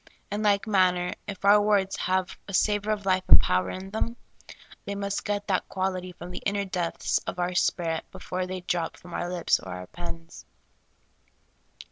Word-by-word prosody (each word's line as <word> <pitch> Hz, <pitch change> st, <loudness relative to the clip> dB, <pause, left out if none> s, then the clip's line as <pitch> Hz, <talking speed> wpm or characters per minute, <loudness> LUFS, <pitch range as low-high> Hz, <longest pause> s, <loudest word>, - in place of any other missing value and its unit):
In 205 Hz, +1 st, -1 dB
like 205 Hz, -1 st, +3 dB
manner, 185 Hz, -4 st, +3 dB
if 200 Hz, -1 st, -6 dB
our 205 Hz, +1 st, +7 dB
words 200 Hz, -2 st, +2 dB
have 185 Hz, 0 st, 0 dB
a 200 Hz, -, -3 dB
sa 205 Hz, +2 st, +3 dB
vor 210 Hz, +1 st, -2 dB
of 205 Hz, -2 st, -2 dB
life 185 Hz, -1 st, +3 dB
and -, -, +9 dB
power 90 Hz, 0 st, +1 dB
in 190 Hz, +1 st, -6 dB
them, 230 Hz, +2 st, -1 dB, 0.7 s
they 200 Hz, -, -4 dB
must 200 Hz, 0 st, -2 dB
get 205 Hz, 0 st, -1 dB
that 190 Hz, -3 st, 0 dB
quality 185 Hz, -1 st, -2 dB
from 175 Hz, 0 st, -9 dB
the -, -, -5 dB
inner 200 Hz, 0 st, 0 dB
depths 180 Hz, -3 st, 0 dB
of -, -, -3 dB
our 180 Hz, 0 st, 0 dB
spirit 165 Hz, -2 st, +1 dB
before 185 Hz, -1 st, -4 dB
they 185 Hz, -, -4 dB
I -, -, -3 dB
6 180 Hz, -, -2 dB
SOUL 175 Hz, -, +2 dB
FOOD. -, -, 0 dB
drop -, -, -17 dB
from 175 Hz, -1 st, -12 dB
our 175 Hz, -, -2 dB
lips 175 Hz, -2 st, +2 dB
or -, -, -11 dB
our 90 Hz, 0 st, -6 dB
pens. 165 Hz, -, -8 dB
185 Hz, 205 wpm, -27 LUFS, 175-200 Hz, 0.7 s, and